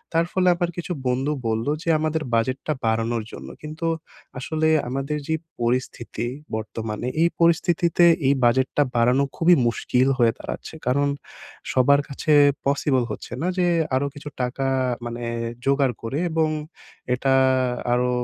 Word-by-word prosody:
তার 165 +1 +4
ফলে 185 -1 +2
আমার 175 0 -1
কিছু 175 +1 -5 0.2
বন্ধু 130 +4 0 0.2
বলল 110 +4 -1 0.2
যে - - -2
আমাদের 155 0 -1
বাজেটটা 130 +6 0
বাড়ানোর 115 0 0
জন্য - - -9
কিন্তু 155 +2 -4 0.5
আসলে 155 +4 -1 0.2
আমাদের 135 +3 -2
যে 160 - +1 0.3
পরিস্থিতি, 120 -1 -2 0.3
বর্তমানে 110 +1 -4
এই 170 - +5
পরিস্থিতিতে 170 0 +3 0.2
এই 140 - +5
বাজেটটা 130 +4 +3
বাড়ানো 125 +4 +3
খুবই 170 +1 +5
মুশকিল 125 +3 +1
হয়ে 115 -2 +4
দাঁড়াচ্ছে - - -7
কারণ 140 +3 +2 0.6
সবার 140 +2 +4
কাছে 150 +2 -2 0.3
পসিবল 140 -2 +2
হচ্ছে - - -7
না 175 - 0
যে 180 -1 +2 0.3
আরো 140 +2 +1
কিছু 145 0 -8
টাকা 125 +2 -2 0.4
মানে 120 0 -5 0.4
জোগাড় 135 -2 +2
করে 130 +6 -3
এবং 160 -1 +2 0.6
এটা 135 +2 +1 0.6
আরো 125 0 +1
135 Hz, 140 wpm, -23 LUFS, 120-155 Hz, 0.6 s, এই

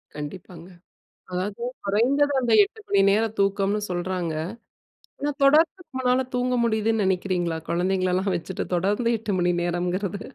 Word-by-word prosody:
கண்டிப்பாங்க. 170 +4 -8 0.6
அதாவது 195 +5 -3 0.2
குறைந்தது 270 +8 +2
அந்த 235 -2 +1
8 430 +2 -7
மணி 200 -1 +3
நேரம் 220 +2 +1
தூக்கம்னு 200 +1 +1
சொல்றாங்க. 175 -1 -2 0.9
ஆனா, 290 +1 -1
தொடர்ந்து 315 +6 +4
போனாலும் 255 0 +1
தூங்க 250 0 0
முடியுதுன்னு 220 -1 +1
நெனைக்குறீங்களா? 180 -3 0
குழந்தைங்களலாம் 185 +2 +1
வச்சுட்டு 175 +2 -4
தொடர்ந்து 205 +7 +1
8 215 -2 -3
மணி 175 0 +2
நேரங்குறது. 180 +3 -2
200 Hz, 120 wpm, -24 LUFS, 180-235 Hz, 0.9 s, தொடர்ந்து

